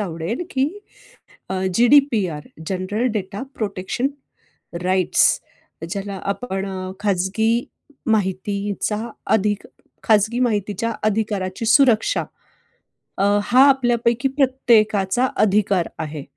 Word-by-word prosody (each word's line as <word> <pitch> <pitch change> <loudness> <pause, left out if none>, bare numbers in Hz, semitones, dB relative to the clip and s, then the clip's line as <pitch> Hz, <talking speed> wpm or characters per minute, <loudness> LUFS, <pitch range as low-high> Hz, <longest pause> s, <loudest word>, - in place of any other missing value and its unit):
आवडेल, 180 - -3
की 265 0 +1 1.1
GDPR, 230 - +3 0.2
general 195 +5 -2
data 200 -1 -4
protection 200 +4 -2 0.8
rights 185 -1 +2 0.7
ज्याला 195 0 -4
आपण 195 -4 -4 0.3
खाजगी 210 +4 0 0.4
माहितीचा 200 0 -1 0.4
अधिक 210 -1 -1 0.4
खाजगी 220 +3 +2
माहितीच्या 220 -1 -1
अधिकाराची 210 -1 -1
सुरक्षा 240 - +4 1.0
अ, - - +1 0.2
हा 250 +5 +4
आपल्यापैकी 240 -1 +2
प्रत्येकाचा 240 -5 +2 0.2
अधिकार 200 -3 +1
आहे. 150 -1 -5
210 Hz, 80 wpm, -21 LUFS, 190-235 Hz, 1.1 s, सुरक्षा